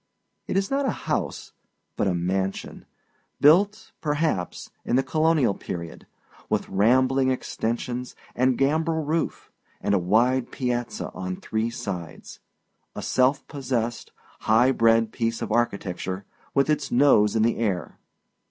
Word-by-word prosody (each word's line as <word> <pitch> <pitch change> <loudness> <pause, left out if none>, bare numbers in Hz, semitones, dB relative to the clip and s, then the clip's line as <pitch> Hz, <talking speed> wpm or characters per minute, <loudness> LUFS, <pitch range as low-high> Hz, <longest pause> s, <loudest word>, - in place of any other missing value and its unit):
It - - -1
is 195 +3 0
not 275 0 +1
a - - -4
house, - - -2 0.4
but - - 0
a 95 - +1
mansion, 95 +3 -2 0.5
built, 200 +8 +4
perhaps, 150 - -1
in - - 0
the 135 - +3
colonial 155 -4 +2
period, 85 -3 -7 0.4
with - - 0
rambling 130 +6 +3
extensions, 125 0 -3 0.2
and 130 0 +2
gambrel 160 +3 +1
roof, 160 +2 -2 0.3
and - - 0
a 100 - +4
wide 120 +8 +2
piazza 120 -2 -3
on 90 0 -4
three 110 +4 -2
sides 95 -9 -7 0.6
a - - -5
self 130 +2 +2
possessed, 125 -4 -3 0.3
high 115 +4 +4
bred 115 -2 +3
piece 115 -1 -1
of - - -4
architecture, 95 -4 -1 0.3
with 140 0 +3
its 150 -3 0
nose 120 -5 +4
in 110 - +3
the 115 - +2
air. 100 -7 -2
120 Hz, 135 wpm, -25 LUFS, 105-140 Hz, 0.6 s, built